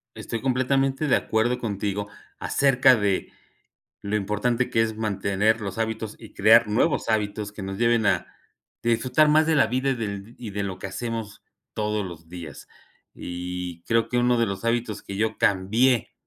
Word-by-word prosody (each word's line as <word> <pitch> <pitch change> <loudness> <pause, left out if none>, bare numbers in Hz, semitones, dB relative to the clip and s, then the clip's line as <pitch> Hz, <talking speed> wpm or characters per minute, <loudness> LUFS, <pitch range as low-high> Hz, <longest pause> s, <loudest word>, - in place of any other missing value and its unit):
Estoy 115 - -5
completamente 135 +2 +1
de 140 - +4
acuerdo 115 +3 0
contigo 100 -2 -3 0.3
acerca 135 -2 +4
de 100 -3 -1 0.7
lo 100 +1 -3
importante 105 +5 0
que 115 - +2
es 110 -1 -2
mantener 105 +1 0
los 100 0 -5
hábitos 110 -1 -3
y 110 - -13
crear 110 +2 +5
nuevos 120 +8 +1
hábitos 105 -1 -1
que 105 -1 -9
nos 95 0 -5
lleven 115 -2 +3
a - - +2 0.6
disfrutar 125 +6 +3
más 155 +1 +4
de 160 -1 +2
la - - +5
vida 130 +4 0
y - - +1
del 105 0 -5
y 115 -4 -7
de 100 +1 -3
lo 95 -1 -4
que - - -5
hacemos 110 +1 -5 0.3
todos 105 -2 -1
los 85 -2 -11
días. 85 -4 -9 0.5
Y 90 -1 -6
creo 115 +3 +1
que 125 - 0
uno 120 0 +3
de 115 - +2
los 100 +1 -5
hábitos 115 -3 -1
que 100 - -7
yo 110 +1 -1
cambié 110 +6 +2
110 Hz, 175 wpm, -25 LUFS, 100-120 Hz, 0.7 s, crear